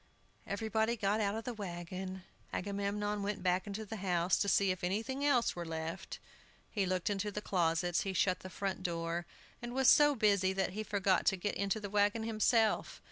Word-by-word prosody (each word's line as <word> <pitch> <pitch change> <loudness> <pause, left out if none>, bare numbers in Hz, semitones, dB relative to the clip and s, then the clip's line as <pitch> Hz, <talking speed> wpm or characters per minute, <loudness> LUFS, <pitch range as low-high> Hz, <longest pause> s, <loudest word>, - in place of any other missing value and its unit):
Everybody 220 +2 0
got 210 0 +1
out 200 0 0
of 225 - -4
the 245 - -4
wagon. 185 -1 -6 0.3
Agamemnon 205 +1 -2
went 200 -1 -3
back 185 +2 +1
into 210 +2 -4
the 220 +2 -6
house, 180 -2 +1
to 200 - +1
see 195 -1 +3
if 185 -1 -5
anything 225 +10 -1
else 255 -5 +3
were 175 - -4
left. 160 0 -5 0.5
He 200 -4 0
looked 185 +2 0
into 205 +1 -1
the 210 - -3
closets; 175 -3 +1
he 195 - -2
shut 185 -1 +2
the 185 - -9
front 190 +1 -3
door, 170 -1 -2 0.3
and 240 +1 -6
was 265 -1 +3
so 295 -1 +6
busy 200 -4 +3
that 190 -1 0
he 210 +3 -4
forgot 200 -3 +1
to 195 - +4
get 205 +3 -2
into 200 +2 -1
the 205 - -5
wagon 205 +2 +2
himself. 220 0 +1
200 Hz, 190 wpm, -34 LUFS, 185-215 Hz, 0.5 s, so